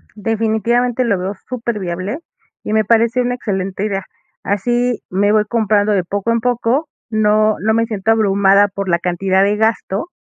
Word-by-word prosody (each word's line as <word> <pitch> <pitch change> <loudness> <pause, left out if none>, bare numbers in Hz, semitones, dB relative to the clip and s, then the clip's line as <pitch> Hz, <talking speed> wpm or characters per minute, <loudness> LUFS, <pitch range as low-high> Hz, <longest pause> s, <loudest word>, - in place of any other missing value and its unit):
Definitivamente 225 +3 0
lo 200 -5 +1
veo 190 +2 -3
súper 235 -3 -3
viable, 185 - -4 0.4
y 215 - -3
me 220 0 +3
parece 230 +2 +2
una 245 0 -1
excelente 195 -3 -3
idea, 195 -2 -2 0.4
así 240 +4 0
me 200 +3 +1
voy 215 -1 +3
comprando 215 -2 +1
de 190 - +1
poco 200 +5 -2
en 230 - +2
poco, 245 +5 0 0.2
no 215 0 +2
no 220 +1 +1
me 230 0 +2
siento 220 -1 -1
abrumada 200 -2 +4
por 195 0 -5
la 170 0 +2
cantidad 190 +2 +1
de 205 +1 +2
gasto, 220 - -1
215 Hz, 170 wpm, -17 LUFS, 195-230 Hz, 0.4 s, abrumada